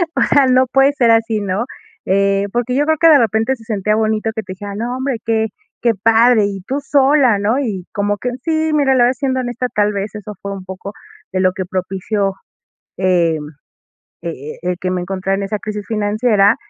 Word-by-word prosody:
o - - +1
sea, 280 -2 +4
no 255 0 +4
puede 270 +1 +4
ser 240 -5 +3
así, 225 -1 +2
¿no? 200 +3 -1 0.4
Eh, 195 +1 +2
porque 245 +1 -1
yo 290 +2 +2
creo 315 +1 +2
que 330 - +6
de 305 - +8
repente 225 +2 +1
se 225 - -16
sentía 210 -2 0
bonito 220 0 0
que 220 - -3
te 185 - -7
decían: 200 +1 -7
"No 240 +3 -3
hombre, 260 -1 -2
qué 220 -1 +1 0.3
qué 235 - +3
padre, 225 0 +5
y 195 -1 -5
tú 275 +2 -1
sola", 275 -5 +3
¿no? 215 +6 +1
Y 205 -10 -3
como 205 0 0
que 250 +4 -3
Sí, 315 -1 0
mira, 280 -3 +3
la 245 - +4
verdad, 250 - +2
siendo 260 -2 0
honesta, 245 0 -3
tal 205 0 +2
vez, 200 +1 -4
eso 210 0 -7
fue 200 0 -5
un 195 -1 -7
poco 190 +2 -8 0.4
de 185 - 0
lo 185 0 +3
que 185 0 -4
propició, 195 +2 -2 0.7
em, 170 -5 +1 0.8
e 170 - -3 0.3
e 180 - -1
el 180 - -2
que 185 - -2
me 180 - -1
encontrara 195 +1 -2
en 200 - -3
esa 210 +2 -3
crisis 210 0 -5
financiera, 210 -1 +2
215 Hz, 210 wpm, -17 LUFS, 195-250 Hz, 0.8 s, de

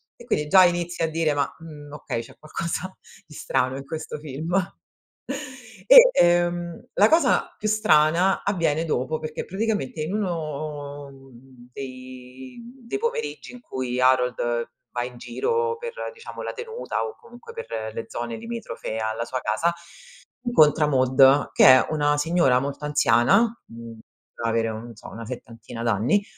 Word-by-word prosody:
e 240 - -15
quindi 150 -11 -1
già 185 +3 +7
inizi 175 0 -1
a 160 - +1
dire: 160 -2 0
"Ma, 140 -1 -1
mhmm, 150 -3 -11
okay 115 -5 -4
c'è 115 - -15
qualcosa 170 +4 -5 0.3
di 155 - -16
strano 130 -2 -1
in 135 0 -7
questo 155 +1 -6
film." 155 +4 -4 1.3
E, - - +10
ehm, 175 0 +1
la 210 +2 +5
cosa 330 +1 +2
più 215 - -3
strana, 180 -3 +3
avviene 165 -5 0
dopo, 155 0 -1
perché 155 0 -5
praticamente, 200 - -2
in 155 +5 -3
uno 150 -6 -4 0.6
dei 130 - -10 0.3
dei - - -2
pomeriggi 465 - -3
in 245 - -12
cui 130 - -4
Harold 125 -2 +1 0.2
va 120 - -2
in 125 0 -8
giro 465 - -1
per 475 0 -6 0.2
diciamo 455 -1 -9
la - - -4
tenuta, 470 0 -4
o 450 - -7
comunque 460 0 -13
per 110 - -5
le 115 - -5
zone 120 -1 -4
limitrofe 230 - -6
alla 110 +1 -2
sua 130 +1 -3
casa, 135 +11 0 0.7
incontra 155 - +4
Maude, 135 +1 +4
che - - +5
è 130 0 +8
una 145 -1 +1
signora 145 -5 +3
molto 140 +2 -5
anziana, 145 - +4 0.3
uhm, 115 -1 -11 0.3
potrà 115 0 -3
avere, 115 0 +1
non 115 +2 -8
so - - -12
una 115 +1 -8
settantina 115 -1 -8
d'anni, 115 - +2
150 Hz, 150 wpm, -24 LUFS, 125-185 Hz, 1.3 s, E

